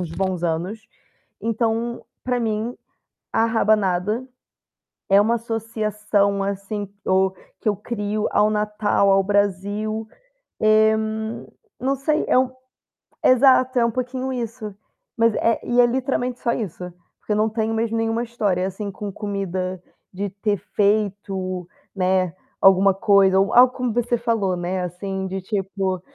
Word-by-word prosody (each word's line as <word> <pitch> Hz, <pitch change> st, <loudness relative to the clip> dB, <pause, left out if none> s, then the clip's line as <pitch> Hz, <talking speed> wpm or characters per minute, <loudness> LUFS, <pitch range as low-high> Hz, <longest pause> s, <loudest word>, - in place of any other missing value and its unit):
uns 175 Hz, -3 st, -4 dB
bons 185 Hz, +1 st, -2 dB
anos, 175 Hz, +6 st, -2 dB, 0.6 s
então, 230 Hz, +1 st, -1 dB, 0.2 s
pra 250 Hz, -1 st, 0 dB
mim, 220 Hz, +1 st, -2 dB, 0.6 s
a 225 Hz, -, +3 dB
rabanada, 215 Hz, 0 st, +1 dB, 0.8 s
é 195 Hz, 0 st, +6 dB
uma 225 Hz, +3 st, +3 dB
associação, 215 Hz, -3 st, -1 dB
assim, 200 Hz, +1 st, -3 dB, 0.2 s
do 190 Hz, 0 st, +2 dB, 0.3 s
que 220 Hz, -, -1 dB
eu 205 Hz, -, +1 dB
crio 210 Hz, 0 st, -2 dB
ao 210 Hz, +1 st, +4 dB
Natal, 210 Hz, -1 st, +1 dB
ao 195 Hz, 0 st, +5 dB
Brasil, 205 Hz, +2 st, -1 dB, 0.5 s
eh, 215 Hz, 0 st, +5 dB
n 220 Hz, +1 st, -4 dB, 0.3 s
não 270 Hz, +2 st, 0 dB
sei, 300 Hz, +3 st, 0 dB
é -, -, +4 dB
o 255 Hz, 0 st, +1 dB, 0.7 s
exato, 255 Hz, 0 st, +5 dB
é 235 Hz, -, +4 dB
um 235 Hz, -, +1 dB
pouquinho 255 Hz, +2 st, -3 dB
isso, 230 Hz, -4 st, -5 dB, 0.4 s
mas 230 Hz, -1 st, +3 dB
é 230 Hz, 0 st, +1 dB
e 245 Hz, -, +1 dB
é -, -, +6 dB
literalmente 250 Hz, 0 st, -1 dB
só 235 Hz, -, +1 dB
isso, 190 Hz, -6 st, -5 dB, 0.4 s
porque -, -, -7 dB
eu 210 Hz, -, +2 dB
não 215 Hz, +1 st, +2 dB
tenho 220 Hz, 0 st, -1 dB
mesmo 230 Hz, 0 st, -1 dB
nenhuma 225 Hz, +1 st, 0 dB
história 205 Hz, -6 st, -1 dB
assim 200 Hz, +1 st, -5 dB
com 205 Hz, +1 st, -6 dB
comida 190 Hz, -3 st, -3 dB, 0.3 s
de 200 Hz, +2 st, -3 dB
ter 205 Hz, +2 st, -1 dB, 0.2 s
feito, 195 Hz, -3 st, 0 dB, 0.3 s
né, 185 Hz, -2 st, +1 dB, 0.3 s
alguma 195 Hz, 0 st, +6 dB
coisa 195 Hz, -1 st, +4 dB
ou 195 Hz, 0 st, +1 dB
algo 250 Hz, +1 st, +7 dB
como 250 Hz, -3 st, -2 dB
você 240 Hz, +1 st, +1 dB
falou, 225 Hz, -6 st, 0 dB
né, 180 Hz, +1 st, -2 dB
assim, 190 Hz, +2 st, -4 dB
de 190 Hz, 0 st, -4 dB
tipo, 190 Hz, -2 st, -2 dB
210 Hz, 145 wpm, -22 LUFS, 195-230 Hz, 0.8 s, algo